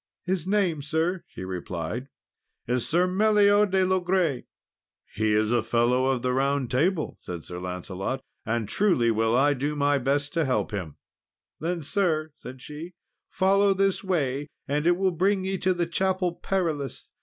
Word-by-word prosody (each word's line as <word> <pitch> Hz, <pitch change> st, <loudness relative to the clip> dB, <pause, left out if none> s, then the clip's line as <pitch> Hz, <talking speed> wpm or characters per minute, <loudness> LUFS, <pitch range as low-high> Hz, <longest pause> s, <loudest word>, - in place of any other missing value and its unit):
"His 185 Hz, -2 st, -2 dB
name, 190 Hz, -7 st, +1 dB
sir," 165 Hz, +5 st, -1 dB
she -, -, -9 dB
replied, 90 Hz, -, -4 dB, 0.6 s
"is 125 Hz, 0 st, -1 dB
Sir 175 Hz, +3 st, +3 dB
Meliot 205 Hz, +1 st, +4 dB
de 190 Hz, 0 st, +2 dB
Logres." 180 Hz, -6 st, +1 dB, 0.7 s
"He 110 Hz, 0 st, +1 dB
is 110 Hz, +1 st, +2 dB
a 120 Hz, -1 st, +3 dB
Fellow 120 Hz, +3 st, +2 dB
of 130 Hz, -2 st, 0 dB
the 125 Hz, 0 st, +1 dB
Round 135 Hz, -1 st, 0 dB
Table," 155 Hz, +5 st, 0 dB
said 85 Hz, -3 st, -7 dB
Sir 90 Hz, 0 st, -6 dB
Lancelot, 90 Hz, +7 st, -4 dB, 0.2 s
"and 115 Hz, -1 st, -1 dB
truly 130 Hz, -, +2 dB
will 115 Hz, +2 st, +2 dB
I 145 Hz, +2 st, +4 dB
do 145 Hz, +3 st, -2 dB
my 145 Hz, -1 st, +2 dB
best 140 Hz, +2 st, 0 dB
to 165 Hz, -1 st, +1 dB
help 130 Hz, -3 st, 0 dB
him." 90 Hz, -8 st, -5 dB, 0.6 s
"Then, 170 Hz, 0 st, -2 dB
sir," 160 Hz, -2 st, 0 dB
said 130 Hz, +1 st, -10 dB
she, 160 Hz, +4 st, -8 dB, 0.3 s
"follow 195 Hz, +1 st, +3 dB
this 195 Hz, 0 st, +1 dB
way, 145 Hz, -7 st, -1 dB, 0.2 s
and 150 Hz, +3 st, 0 dB
it 175 Hz, 0 st, +4 dB
will 190 Hz, 0 st, +2 dB
bring 190 Hz, +3 st, +1 dB
ye 190 Hz, -1 st, -2 dB
to 185 Hz, -, +2 dB
the 175 Hz, -1 st, 0 dB
Chapel 185 Hz, +1 st, 0 dB
Perilous. 160 Hz, -8 st, -2 dB
150 Hz, 165 wpm, -26 LUFS, 125-185 Hz, 0.7 s, Meliot